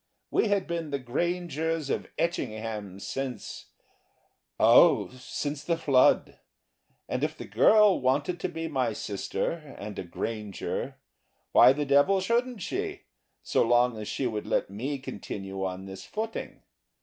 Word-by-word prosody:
We -, -, +3 dB
had 200 Hz, -2 st, +1 dB
been 170 Hz, -2 st, -3 dB
the 140 Hz, -, -1 dB
Grangers 160 Hz, +2 st, -2 dB
of -, -, -2 dB
Etchingham 110 Hz, -, -3 dB
since 130 Hz, +4 st, -5 dB, 0.9 s
oh, -, -, +6 dB
since 145 Hz, +3 st, -5 dB
the 170 Hz, +1 st, 0 dB
flood. 135 Hz, -5 st, +3 dB, 0.7 s
And -, -, -2 dB
if -, -, -1 dB
the -, -, -7 dB
girl 200 Hz, -, +5 dB
wanted 140 Hz, +7 st, +1 dB
to -, -, -2 dB
be 165 Hz, 0 st, -4 dB
my 130 Hz, -7 st, 0 dB
sister 120 Hz, -, -4 dB
and 105 Hz, 0 st, -6 dB
a -, -, -3 dB
Granger, 105 Hz, +3 st, -4 dB, 0.6 s
why 125 Hz, -, +8 dB
the 145 Hz, +1 st, -2 dB
devil 145 Hz, +8 st, +4 dB
shouldn't 235 Hz, +2 st, 0 dB
she, 395 Hz, 0 st, -3 dB, 0.4 s
so -, -, +1 dB
long 120 Hz, +1 st, +3 dB
as 105 Hz, -, -6 dB
she 135 Hz, -, -2 dB
would 110 Hz, -3 st, -3 dB
let -, -, 0 dB
me 130 Hz, +8 st, -3 dB
continue 95 Hz, -6 st, -6 dB
on 95 Hz, 0 st, -4 dB
this 95 Hz, 0 st, -8 dB
footing? 220 Hz, +1 st, -5 dB
135 Hz, 140 wpm, -28 LUFS, 110-170 Hz, 0.9 s, why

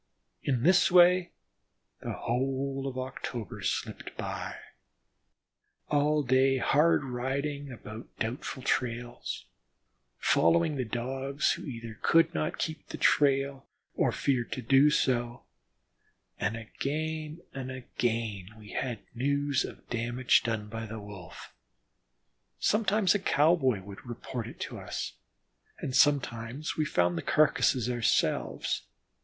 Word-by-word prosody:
In 125 Hz, -4 st, 0 dB
this 180 Hz, +3 st, +5 dB
way 180 Hz, 0 st, +6 dB, 0.7 s
the -, -, -4 dB
whole 135 Hz, +2 st, -1 dB
of 130 Hz, -1 st, -5 dB
October 125 Hz, -5 st, -5 dB
slipped -, -, -3 dB
by; -, -, -4 dB, 1.3 s
all 150 Hz, +1 st, +2 dB
day 130 Hz, +1 st, +4 dB
hard 150 Hz, +5 st, +3 dB
riding 135 Hz, +3 st, -3 dB
after 110 Hz, -1 st, -8 dB
doubtful 125 Hz, +3 st, -4 dB
trails, 120 Hz, -2 st, -2 dB, 0.7 s
following 165 Hz, -2 st, +3 dB
the 130 Hz, -2 st, -1 dB
Dogs, 130 Hz, +5 st, -1 dB
who -, -, -4 dB
either 115 Hz, -5 st, -7 dB
could 165 Hz, 0 st, +4 dB
not 75 Hz, 0 st, -1 dB
keep 155 Hz, -1 st, -4 dB
the -, -, -6 dB
big -, -, -20 dB
trail 135 Hz, -1 st, +3 dB, 0.3 s
or -, -, +2 dB
feared 125 Hz, -4 st, 0 dB
to -, -, -4 dB
do 135 Hz, +5 st, +6 dB
so, 120 Hz, -4 st, 0 dB, 1.0 s
and 110 Hz, +2 st, -1 dB
again 155 Hz, +7 st, -4 dB
and 130 Hz, -1 st, -5 dB
again 115 Hz, -6 st, -2 dB
we 105 Hz, -1 st, -12 dB
had 120 Hz, -5 st, -3 dB
news 140 Hz, +2 st, +1 dB
of -, -, -9 dB
damage 120 Hz, +1 st, +2 dB
done 110 Hz, -3 st, -2 dB
by 110 Hz, +1 st, -5 dB
the 110 Hz, +1 st, -6 dB
Wolf; 100 Hz, -4 st, -10 dB, 1.0 s
sometimes 210 Hz, -2 st, +3 dB
a 205 Hz, -, +1 dB
cowboy 145 Hz, -, +3 dB
would 100 Hz, 0 st, -10 dB
report 120 Hz, -1 st, -5 dB
it -, -, -10 dB
to -, -, -5 dB
us; -, -, -4 dB, 0.6 s
and 130 Hz, -, -4 dB
sometimes 135 Hz, -1 st, +2 dB
we 155 Hz, -, +1 dB
found 90 Hz, -, +1 dB
the -, -, -3 dB
carcasses 135 Hz, -, +3 dB
ourselves. 120 Hz, -2 st, 0 dB
130 Hz, 125 wpm, -29 LUFS, 115-145 Hz, 1.3 s, way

